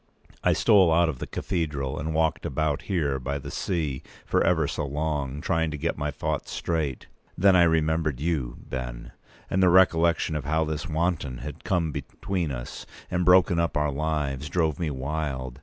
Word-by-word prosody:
I -, -, +4 dB
stole 95 Hz, -5 st, +5 dB
out 85 Hz, +1 st, +4 dB
of 70 Hz, -6 st, -4 dB
the -, -, -5 dB
cathedral, 75 Hz, -7 st, -2 dB
and 80 Hz, +2 st, -3 dB
walked 80 Hz, 0 st, +1 dB
about 75 Hz, +1 st, -1 dB
here 75 Hz, -8 st, 0 dB
by 70 Hz, +2 st, -3 dB
the 70 Hz, -, -7 dB
sea 75 Hz, -8 st, -2 dB, 0.2 s
for -, -, +2 dB
ever 80 Hz, -4 st, +2 dB
so 75 Hz, -, -3 dB
long, 75 Hz, -1 st, -2 dB
trying 80 Hz, 0 st, +1 dB
to 75 Hz, -, -4 dB
get -, -, -1 dB
my 75 Hz, 0 st, -2 dB
thoughts 70 Hz, -, -3 dB
straight. 80 Hz, -6 st, -2 dB, 0.3 s
Then 95 Hz, +1 st, +5 dB
I 90 Hz, -, +6 dB
remembered 80 Hz, -3 st, +1 dB
you, 75 Hz, -6 st, -1 dB
Ben; -, -, -5 dB, 0.4 s
and 95 Hz, -, 0 dB
the 90 Hz, -, +6 dB
recollection 85 Hz, -3 st, +4 dB
of 75 Hz, -, -2 dB
how 80 Hz, +3 st, +1 dB
this 75 Hz, -1 st, -3 dB
wanton 80 Hz, -5 st, -1 dB
had 75 Hz, +1 st, -7 dB
come 85 Hz, -4 st, 0 dB
between 90 Hz, +3 st, -3 dB
us -, -, -7 dB, 0.2 s
and 90 Hz, 0 st, +1 dB
broken 90 Hz, -1 st, +5 dB
up 85 Hz, -5 st, 0 dB
our 75 Hz, -1 st, +1 dB
lives 75 Hz, -1 st, -2 dB
drove 80 Hz, -4 st, 0 dB
me 85 Hz, -3 st, -1 dB
wild. 65 Hz, -2 st, -3 dB
80 Hz, 180 wpm, -26 LUFS, 70-85 Hz, 0.4 s, I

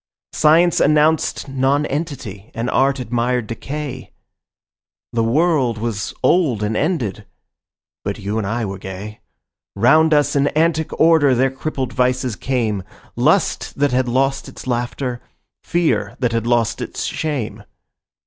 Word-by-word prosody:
Science 165 Hz, +3 st, +4 dB
announced 155 Hz, 0 st, +2 dB
nonentity 135 Hz, -, -2 dB
and 115 Hz, +2 st, -2 dB
art 135 Hz, +1 st, +2 dB
admired 120 Hz, 0 st, -1 dB
decay; 135 Hz, +4 st, -6 dB, 1.0 s
The 115 Hz, -1 st, +1 dB
world 135 Hz, -1 st, +2 dB
was 110 Hz, -2 st, -3 dB
old 140 Hz, -, +2 dB
and 105 Hz, +1 st, -1 dB
ended: 110 Hz, -, -1 dB, 0.8 s
but -, -, -3 dB
you 105 Hz, +3 st, -3 dB
and 100 Hz, -, -2 dB
I 115 Hz, +2 st, -1 dB
were 100 Hz, -1 st, -5 dB
gay; 95 Hz, +3 st, -8 dB, 0.6 s
Round 155 Hz, +10 st, +4 dB
us 145 Hz, -1 st, +3 dB
in 140 Hz, 0 st, +3 dB
antic 160 Hz, -1 st, +1 dB
order 160 Hz, -5 st, +5 dB
their 130 Hz, +2 st, +2 dB
crippled 135 Hz, -2 st, -4 dB
vices 125 Hz, -1 st, 0 dB
came— 110 Hz, -2 st, -1 dB, 0.3 s
Lust -, -, +1 dB
that 145 Hz, -1 st, +2 dB
had 125 Hz, 0 st, +1 dB
lost 135 Hz, +3 st, 0 dB
its -, -, -11 dB
laughter, 120 Hz, 0 st, -2 dB, 0.4 s
fear 170 Hz, -1 st, 0 dB
that 125 Hz, -3 st, 0 dB
had 115 Hz, 0 st, -1 dB
lost 120 Hz, -1 st, +1 dB
its -, -, -4 dB
shame. 115 Hz, -9 st, -3 dB
125 Hz, 130 wpm, -19 LUFS, 115-150 Hz, 1.0 s, order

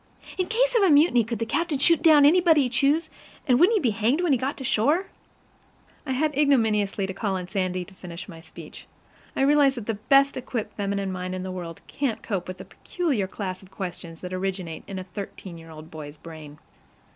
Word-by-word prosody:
In 365 Hz, -, +1 dB
case -, -, +1 dB
of 460 Hz, -, +4 dB
a 390 Hz, -, +5 dB
mutiny, 290 Hz, -5 st, +5 dB
could 230 Hz, +1 st, -4 dB
the 230 Hz, -, -2 dB
captain 310 Hz, +6 st, -1 dB
shoot 325 Hz, +4 st, +3 dB
down 305 Hz, -4 st, +6 dB
anybody 325 Hz, -1 st, +5 dB
he 250 Hz, -, -1 dB
chose, 285 Hz, +6 st, +2 dB, 0.4 s
and 250 Hz, -1 st, +4 dB
wouldn't 380 Hz, +7 st, +5 dB
he -, -, +2 dB
be 250 Hz, -, +1 dB
hanged 225 Hz, +9 st, +1 dB
when 350 Hz, -4 st, +1 dB
he 265 Hz, -, +4 dB
got 270 Hz, +4 st, -2 dB
to 270 Hz, -, -7 dB
shore? 290 Hz, -, +2 dB, 1.0 s
I 265 Hz, -, -1 dB
had 295 Hz, +2 st, 0 dB
ignominiously 220 Hz, -9 st, +2 dB
to 190 Hz, -, -5 dB
call 195 Hz, 0 st, -2 dB
upon 180 Hz, -1 st, -6 dB
Sandy 185 Hz, -2 st, -2 dB
to 195 Hz, -, -16 dB
finish 180 Hz, -1 st, -9 dB
my 165 Hz, -4 st, -11 dB
speech. -, -, -13 dB, 0.5 s
I -, -, -1 dB
realize 280 Hz, -1 st, +4 dB
that 235 Hz, -4 st, -6 dB
the 225 Hz, -, -1 dB
best 275 Hz, +7 st, +3 dB
equipped 245 Hz, -3 st, -5 dB
feminine 200 Hz, -1 st, -2 dB
mind 185 Hz, 0 st, -4 dB
in 185 Hz, -, -5 dB
the 185 Hz, -, -5 dB
world 175 Hz, -3 st, -7 dB
can't 270 Hz, -6 st, -3 dB
cope 195 Hz, -5 st, -3 dB
with 185 Hz, 0 st, -6 dB
the 190 Hz, -, -10 dB
peculiar 270 Hz, -, -2 dB
class 185 Hz, -2 st, -5 dB
of 190 Hz, -, -17 dB
questions 175 Hz, -4 st, -7 dB
that 180 Hz, 0 st, -6 dB
originate 185 Hz, -3 st, -4 dB
in 195 Hz, -, -6 dB
a 185 Hz, -, -4 dB
thirteen 185 Hz, -2 st, -8 dB
year 165 Hz, 0 st, -13 dB
boy's 155 Hz, -2 st, -10 dB
brain. 155 Hz, -2 st, -11 dB
215 Hz, 215 wpm, -25 LUFS, 185-285 Hz, 1.0 s, down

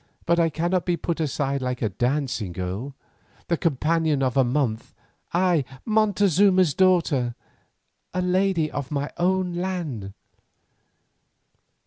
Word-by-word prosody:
But 170 Hz, 0 st, +2 dB
I 165 Hz, -1 st, +3 dB
cannot 175 Hz, +3 st, 0 dB
be 175 Hz, -1 st, +1 dB
put 165 Hz, +1 st, -3 dB
aside 140 Hz, -3 st, -1 dB
like 125 Hz, -1 st, -3 dB
a 110 Hz, -, +1 dB
dancing 120 Hz, -2 st, -1 dB
girl, 95 Hz, +10 st, -5 dB, 0.5 s
the 170 Hz, -, +3 dB
companion 160 Hz, -1 st, +1 dB
of 130 Hz, -2 st, 0 dB
a 135 Hz, -, +5 dB
month, 125 Hz, -3 st, -1 dB, 0.4 s
I, 175 Hz, -4 st, +2 dB, 0.2 s
Montezuma's 200 Hz, -5 st, +3 dB
daughter, 165 Hz, -9 st, +2 dB, 0.8 s
a 180 Hz, +1 st, -1 dB
lady 180 Hz, -3 st, +1 dB
of 140 Hz, -2 st, -4 dB
my 145 Hz, -1 st, -2 dB
own 185 Hz, 0 st, +1 dB
land. 170 Hz, -, -4 dB
160 Hz, 120 wpm, -24 LUFS, 130-180 Hz, 0.8 s, a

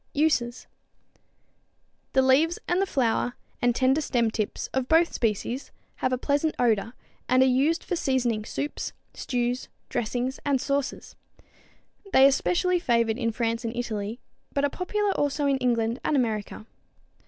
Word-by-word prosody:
Uses. 265 Hz, -5 st, +1 dB, 1.5 s
The 265 Hz, -, +4 dB
leaves 295 Hz, +6 st, +4 dB
and 355 Hz, +2 st, +2 dB
the 390 Hz, -, +1 dB
flower 245 Hz, -4 st, 0 dB, 0.3 s
and 245 Hz, -1 st, +2 dB
tender 265 Hz, +4 st, +3 dB
stem 235 Hz, -6 st, +1 dB
tips 215 Hz, -2 st, -3 dB
of 265 Hz, -1 st, 0 dB
both 330 Hz, +2 st, +4 dB
species 230 Hz, +4 st, -2 dB, 0.3 s
have 255 Hz, -, 0 dB
a 255 Hz, -, +1 dB
pleasant 290 Hz, +4 st, 0 dB
odor, 225 Hz, -1 st, +1 dB, 0.4 s
and 255 Hz, +1 st, +5 dB
are -, -, +5 dB
used 275 Hz, +6 st, +2 dB
for 360 Hz, -, -2 dB
seasoning 250 Hz, -8 st, 0 dB
soups, 285 Hz, +6 st, -4 dB, 0.2 s
stews, 245 Hz, 0 st, -2 dB, 0.2 s
dressings 245 Hz, +3 st, -2 dB
and 280 Hz, -2 st, +1 dB
sauces. 280 Hz, +1 st, -2 dB, 1.0 s
They 265 Hz, -, +8 dB
are 275 Hz, -, +7 dB
specially 360 Hz, +5 st, +1 dB
favored 235 Hz, -5 st, +1 dB
in 230 Hz, -2 st, 0 dB
France 230 Hz, 0 st, -1 dB
and 230 Hz, 0 st, -3 dB
Italy, 220 Hz, -1 st, -3 dB, 0.3 s
but 280 Hz, -, -1 dB
are 285 Hz, -, -1 dB
popular 410 Hz, +3 st, -1 dB
also 290 Hz, -3 st, 0 dB
in 275 Hz, -1 st, +2 dB
England 235 Hz, -1 st, 0 dB
and 305 Hz, -, +1 dB
America. 220 Hz, -4 st, -1 dB
255 Hz, 150 wpm, -26 LUFS, 235-285 Hz, 1.5 s, They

